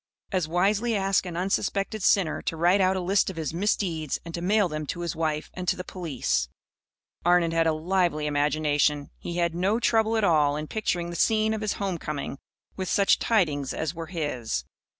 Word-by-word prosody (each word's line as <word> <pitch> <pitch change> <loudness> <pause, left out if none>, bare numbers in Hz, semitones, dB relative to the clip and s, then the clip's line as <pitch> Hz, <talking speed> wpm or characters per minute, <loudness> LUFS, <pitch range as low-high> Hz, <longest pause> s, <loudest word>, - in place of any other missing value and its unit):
As 185 -5 0
wisely 200 +7 +1
ask 195 -2 +1
an 170 -1 -5
unsuspected 195 +3 -1
sinner 180 -4 +2
to 165 - -3
write 175 +4 +4
out 190 0 +3
a - - -2
list 195 +3 +2
of 190 - -6
his 160 -2 -3
misdeeds 170 -5 -1
and 170 - -8
to 170 - -4
mail 200 +2 +3
them 155 -2 -5
to 175 - -4
his 170 -1 -3
wife 155 -1 -2
and 180 -1 -6
to - - +3
the 180 - -6
police. 125 - -2 0.7
Arnon 175 -1 +3
had 165 0 +2
a - - +4
lively 165 -1 0
imagination. 150 0 +1
He 170 - -5
had 170 -1 +1
no 190 +6 +1
trouble 225 -1 +2
at 220 - +1
all 150 -6 +3
in 150 +1 -3
picturing 175 -2 -2
the - - -6
scene 220 +4 +2
of 220 - -3
his 215 -1 0
home 190 -4 -3
coming 145 -2 -5 0.4
with 185 -2 -4
such 200 -1 +3
tidings 155 - +1
as 160 0 -2
were 165 -1 -6
his. 130 - -3
175 Hz, 200 wpm, -26 LUFS, 155-195 Hz, 0.7 s, write